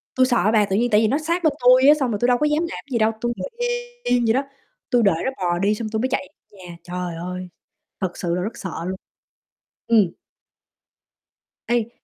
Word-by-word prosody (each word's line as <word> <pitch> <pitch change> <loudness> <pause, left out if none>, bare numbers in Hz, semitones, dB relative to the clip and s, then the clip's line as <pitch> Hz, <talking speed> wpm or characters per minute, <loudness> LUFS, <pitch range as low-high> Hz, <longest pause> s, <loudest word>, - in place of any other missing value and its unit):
tui 255 0 +4
sợ 235 -6 +2
bà. 210 -2 +4
Tự 195 - -1
nhiên 240 +3 +2
tại 210 +1 +5
vì 220 - +3
nó 275 - +1
sát 335 +3 -2
bên 310 -3 +3
tui 255 +2 +6
á, 295 - +9
xong 255 -4 0
rồi 205 - -2
tui 240 - +2
đâu 245 -1 +4
có 300 - +1
dám 300 +3 +1
làm - - -7
gì 235 - +1
đâu, 220 0 +3
tui 240 0 -1
ngồi - - -5 0.5
yên 245 -1 +2
vậy 225 - +3
đó, 270 +2 +1 0.5
tui 245 -3 +3
đợi 195 -5 +4
nó 265 - 0
bò 175 -1 -1
đi 205 +2 +2
xong 215 0 -4
tui 220 0 -2
mới 260 +3 0
chạy 280 - -2 0.2
nhà. 180 -4 -11
Trời 180 -1 -5
ơi, 180 +1 -6 0.5
thật 180 -2 -3
sự 170 -1 -1
là 180 - -1
rất 215 +4 -4
sợ 190 - -5 0.2
luôn. 190 +1 -3 0.9
Ừm. 210 -7 +4 1.6
Ấy 235 -1 +1
220 Hz, 230 wpm, -22 LUFS, 185-250 Hz, 1.6 s, á